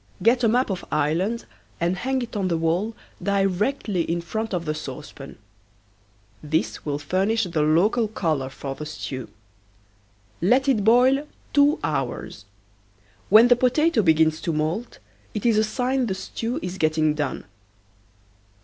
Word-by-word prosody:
Get 240 +3 +4
a - - +5
map 245 0 +2
of 185 - -4
Ireland 170 +10 0 0.3
and 175 +2 +1
hang 260 +6 -1
it 235 - -8
on 195 -3 0
the 170 -2 0
wall 175 +7 0 0.3
directly 200 +1 0
in 170 +1 -1
front 220 +6 -4
of 175 -3 -2
the 155 - -1
saucepan. 140 -1 -8 1.0
This 155 +2 -2
will 145 -1 -2
furnish 190 +9 0
the 170 -5 -1
local 190 +10 +3
color 155 -10 -1
for 135 0 -6
the 150 +2 -7
stew. 130 -5 -6 1.1
Let 250 +10 +3
it 235 -7 +2
boil 255 +6 +4 0.3
two 290 +2 +4
hours. 135 -7 -3 0.8
When 220 +5 +8
the 245 - +6
potato 255 +2 +2
begins 160 -3 +3
to 170 - -1
moult 160 +10 -2 0.4
it 210 - -3
is 225 -3 +4
a - - +3
sign 250 +3 0
the 190 - -2
stew 225 +5 -4
is 180 +1 -5
getting 155 -1 +2
done. 150 -2 -3
190 Hz, 150 wpm, -24 LUFS, 155-230 Hz, 1.1 s, When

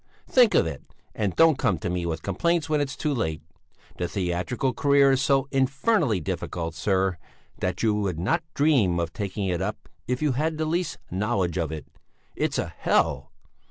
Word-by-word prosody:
Think 245 -4 +4
of - - +5
it! 80 -5 -5 0.3
And 100 -4 -1
don't 165 -4 +5
come 105 -9 +2
to 80 - -4
me 90 -1 -2
with 80 -1 -3
complaints 165 - 0
when 150 -2 +1
it 145 - -1
is - - -6
too 150 -2 -1
late. 80 - -2 0.6
The 90 - 0
theatrical 95 +9 -1
career 140 -1 +4
is 135 -1 +2
so 135 0 +2
infernally 135 - +2
difficult, 85 +1 -4
sir, 95 +2 0 0.4
that 90 +2 -2
you 110 -2 +3
would 100 -5 -1
not 130 - +1
dream 130 - +3
of 85 -1 -2
taking 100 -1 -3
it 90 -1 -1
up, 105 +3 -4 0.2
if 125 0 -1
you 150 -2 +1
had 155 +5 -1
the 155 - -1
least 165 0 -1
knowledge 95 -2 0
of 80 -3 -1
it! 75 -3 -6 0.5
It's - - -1
a - - -3
hell! 70 +1 +1
105 Hz, 190 wpm, -25 LUFS, 90-140 Hz, 0.6 s, of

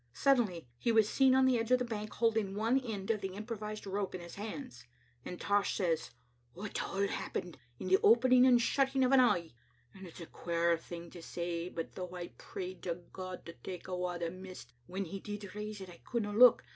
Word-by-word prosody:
Sud 270 - +4
denly 180 - -2
he 235 - +1
was 220 -2 +5
seen 265 +2 +4
on 265 0 +5
the 255 -2 +4
edge 225 - -2
of 255 - +6
the 250 - -2
bank, 215 -2 -4
holding 220 -4 +1
one 225 +5 +2
end 220 -6 -3
of 215 -2 -1
the 190 -1 -4
improvised 215 0 -5
rope 195 -1 -2
in 180 - -5
his 170 0 -10
hand. 215 - -7 0.4
As 180 - -5
Tosh 200 +2 +1
says 170 -5 0 0.2
— 120 -1 -39
" 120 0 -36
It 205 - -3
all 200 +1 0
happened 175 -5 -4 0.2
in - - -6
the 190 +1 +5
opening 250 +3 +6
and 245 -2 +6
shutting 270 +2 +2
o' 255 - +2
an 270 - +7
eye. 175 - +3 0.4
It's 185 -3 -11
a 170 - -6
queer 170 0 +1
thing 170 0 -9
to 175 - -10
say, 170 +1 -3
but 165 -2 -5
though 180 -1 -6
I 175 -1 -5
prayed 185 -1 -7
to 170 -2 -2 0.2
God 185 -1 -7
to 170 - -8
take 180 0 -8
awa 180 -1 -2
the 170 -1 -2
mist, 185 -9 -10
when 190 +2 -3
He 195 +3 -6
did 205 -1 -7
raise 210 0 -5
it 190 - -8
Icouldna 205 +4 -4
look. 245 +1 +8
195 Hz, 220 wpm, -33 LUFS, 175-225 Hz, 0.4 s, look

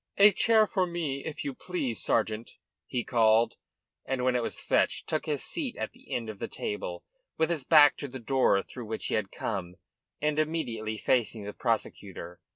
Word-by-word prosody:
"A 205 +1 +8
chair 220 +3 +4
here - - +6
for 190 -4 0
me, 155 -6 -3
if 155 - -4
you 140 - -2
please, 130 - -3
sergeant," 110 0 0 0.3
he 120 - -2
called 115 0 +4 0.5
and, 130 -1 -2
when 130 0 +2
it 125 - +2
was - - -3
fetched, - - +1
took 155 +1 -1
his 150 -3 -1
seat 280 -7 -2
at - - -3
the 255 +2 -19
end 115 -2 -2
of 110 -2 -7
the - - -3
table, 460 +2 -4 0.3
with 160 +1 +2
his 155 -6 -2
back 150 -2 +7
to 145 - -5
the 130 0 -7
door 125 -5 +2
through 125 -2 -9
which 110 0 -4
he - - -2
had 105 -3 0
come 90 -5 -4 0.4
and 150 0 +1
immediately 120 -9 -2
facing 115 -2 +1
the 105 +1 -6
prosecutor. 100 -7 -3
130 Hz, 195 wpm, -29 LUFS, 110-160 Hz, 0.5 s, A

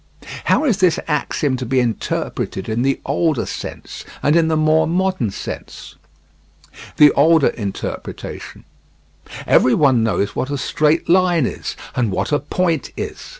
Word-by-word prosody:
How - - +2
is 235 -9 +2
this 180 -4 +3
axiom 150 -3 -1
to 130 - -4
be 130 +2 +2
interpreted 115 -4 -3
in 110 +2 -1
the 135 +1 +1
older 155 -1 0
sense - - -7 0.2
and 150 +2 +3
in 165 -1 +4
the 160 -1 +1
more 155 +1 +3
modern 185 - 0
sense? 95 - -8 1.0
The 150 -1 +7
older 160 +1 +4
interpretation: 100 -4 -6 0.8
Every 125 - +4
one 135 -6 +3
knows 105 -2 -1
what 130 - -2
a 145 - -2
straight 155 +3 +1
line 175 -4 +3
is, - - -5 0.2
and 120 -3 +1
what 95 - -2
a 145 - +2
point 165 +2 -1
is. - - -6
150 Hz, 150 wpm, -19 LUFS, 125-165 Hz, 1.0 s, The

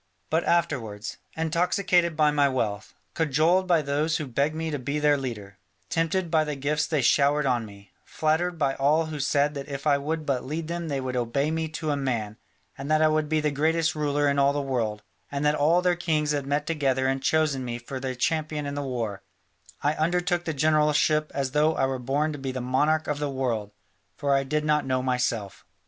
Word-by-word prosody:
But 160 +2 +2
afterwards, 125 -12 -1 0.2
intoxicated 170 +1 +1
by 150 -1 +4
my 145 -1 +3
wealth, 110 -6 -3 0.2
cajoled 160 +5 +2
by 170 -4 +3
those 150 +3 0
who 155 - -4
begged 140 +4 0
me 160 0 -3
to 145 - -2
be 140 +4 -2
their 150 -1 +3
leader, 105 -8 -6 0.3
tempted 165 +1 0
by 160 -2 +4
the 150 -1 -3
gifts 145 +2 -1
they 155 -5 0
showered 145 +3 +3
on 120 -4 0
me, 100 0 -15
flattered 165 +3 0
by 140 -3 +1
all 150 +4 +2
who 155 -1 -6
said 140 +1 +1
that 140 -1 -7
if 140 0 -6
I 145 -2 +3
would 155 +2 -3
but 135 -3 -1
lead 155 +4 -4
them 170 0 -4
they 140 -3 -2
would 130 -1 -4
obey 125 +5 0
me 160 0 -1
to 155 -2 -2
a - - +1
man, 115 -6 -2 0.4
and 135 +2 -7
that 155 0 +3
I 155 - +5
would 155 -1 0
be 155 -1 +1
the 150 0 0
greatest 160 +3 +1
ruler 145 -1 0
in 140 0 +2
all 140 0 +4
the 145 - -1
world, 115 -7 -2 0.3
and 140 +1 -2
that 150 - +4
all 160 +4 +3
their 180 -1 +3
kings 155 -3 0
had 145 -2 -2
met 145 +1 0
together 135 -5 0
and 135 0 0
chosen 150 -3 +1
me 120 -1 -4
for 130 +3 -7
their 130 -1 -3
champion 150 +2 -1
in 140 - -4
the 145 - -3
war, 115 -7 -3 0.6
I 145 +1 +2
undertook 175 +2 0
the 160 - -2
generalship 150 +1 +2
as 135 -2 -1
though 150 +2 +2
I - - +2
were 135 -1 -2
born 145 +5 0
to 145 - -7
be 135 -1 -3
the 130 - -4
monarch 150 +5 +1
of 150 -1 -2
the 145 -1 -1
world, 120 -6 -2 0.5
for 140 -1 +1
I 135 0 +2
did 150 +2 -1
not 150 -1 +2
know 130 -1 0
myself. 120 -6 -1
145 Hz, 220 wpm, -26 LUFS, 135-155 Hz, 0.6 s, I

